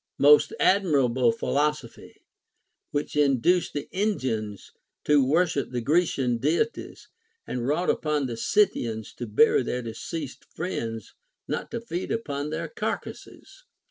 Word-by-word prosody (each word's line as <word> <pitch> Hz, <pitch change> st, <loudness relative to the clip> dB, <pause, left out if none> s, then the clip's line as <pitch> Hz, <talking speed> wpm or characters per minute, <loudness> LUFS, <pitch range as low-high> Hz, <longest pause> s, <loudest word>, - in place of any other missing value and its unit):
Most 145 Hz, +1 st, +6 dB
admirable 135 Hz, -, +3 dB
philosophy! 145 Hz, +1 st, -3 dB, 0.7 s
Avhich 145 Hz, 0 st, -3 dB
induced 145 Hz, +6 st, +2 dB
the 145 Hz, -1 st, -4 dB
Indians 130 Hz, -, -2 dB, 0.3 s
to 150 Hz, -2 st, +4 dB
worship 155 Hz, +1 st, +1 dB
the 125 Hz, -, -3 dB
Grecian 135 Hz, -3 st, +1 dB
Deities, 170 Hz, -, -1 dB, 0.4 s
and 125 Hz, -1 st, -3 dB
wrought 160 Hz, +6 st, +2 dB
upon 150 Hz, -2 st, -1 dB
the 120 Hz, -2 st, -4 dB
Scythians 115 Hz, -, 0 dB
to 120 Hz, -, -6 dB
bury 110 Hz, +9 st, +4 dB
their 125 Hz, 0 st, -3 dB
deceased 130 Hz, +6 st, -6 dB
friends, 115 Hz, -, -4 dB, 0.3 s
not -, -, -3 dB
to 235 Hz, -, -4 dB
feed 190 Hz, -6 st, -5 dB
upon 145 Hz, -10 st, -3 dB
their 155 Hz, -, -3 dB
carcasses. -, -, -6 dB
145 Hz, 120 wpm, -26 LUFS, 120-175 Hz, 0.7 s, Most